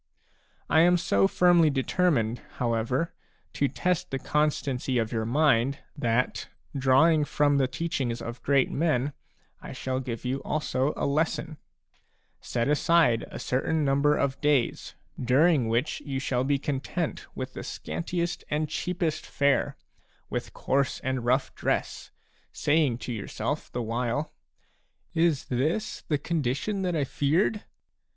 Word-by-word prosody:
I 160 - +4
am 175 +2 +6
so 100 - +3
firmly 175 - +4
determined, 135 -4 +1
however, 120 +6 -1 0.4
to 140 - +1
test 180 +5 -1
the 135 - -2
constancy 135 -3 0
of 115 -2 0
your 110 -1 -1
mind 135 -1 +3 0.2
that, 125 -3 0 0.3
drawing 140 +4 +4
from 145 -1 +2
the 130 - +3
teachings 130 -4 -2
of 115 +1 -7
great 140 -2 +2
men, 145 -3 +1 0.5
I - - -8
shall 130 0 -2
give 125 -2 -5
you 130 +2 -1
also 145 -2 0
a - - -1
lesson: 155 +1 -1 0.8
Set 120 -1 -2
aside 150 -5 +3
a - - -7
certain 150 +4 0
number 140 +2 +3
of 135 -1 -1
days, 145 -5 +1 0.3
during 135 +1 +4
which 120 +6 0
you 135 -2 -4
shall 130 -2 0
be 140 +1 +2
content 145 +4 -3
with 130 0 -5
the - - -6
scantiest 170 0 -3
and 150 +1 0
cheapest 165 -1 -2
fare, 140 0 +1 0.5
with - - -3
coarse 140 0 0
and 130 -2 -2
rough 130 +2 +1
dress, - - -2 0.4
saying 145 -5 +2
to 125 - -5
yourself 105 -3 -4
the 120 - -3
while: 120 +6 -2 0.4
" - - -44
Is 165 -4 +2
this 160 - -1
the 150 - +1
condition 150 - -1
1 - - -2
that 180 -2 0
I 150 - +1
feared 160 - +1
140 Hz, 140 wpm, -27 LUFS, 125-155 Hz, 0.8 s, am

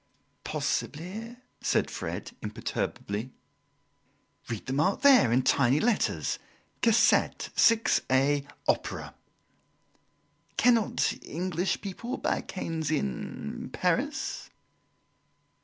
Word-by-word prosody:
"Possibly," 215 +10 -3 0.2
said - - +1
Fred, - - -5
imperturbably. 105 +6 -4 1.2
"Read 115 -3 -4
the 130 - -3
mark 155 - +1
there, 260 - +7
in 125 +2 +3
tiny 135 +1 +3
letters: 230 +2 +1 0.4
Cassette, 230 -1 +3
6a, 145 - +3 0.2
Opera." - - -1 1.4
"Cannot 235 -3 +3
English 180 +2 -2
people 235 +7 -5
buy - - 0
canes 165 -5 -4
in 70 - -3
Paris?" - - -1
170 Hz, 80 wpm, -28 LUFS, 135-225 Hz, 1.4 s, there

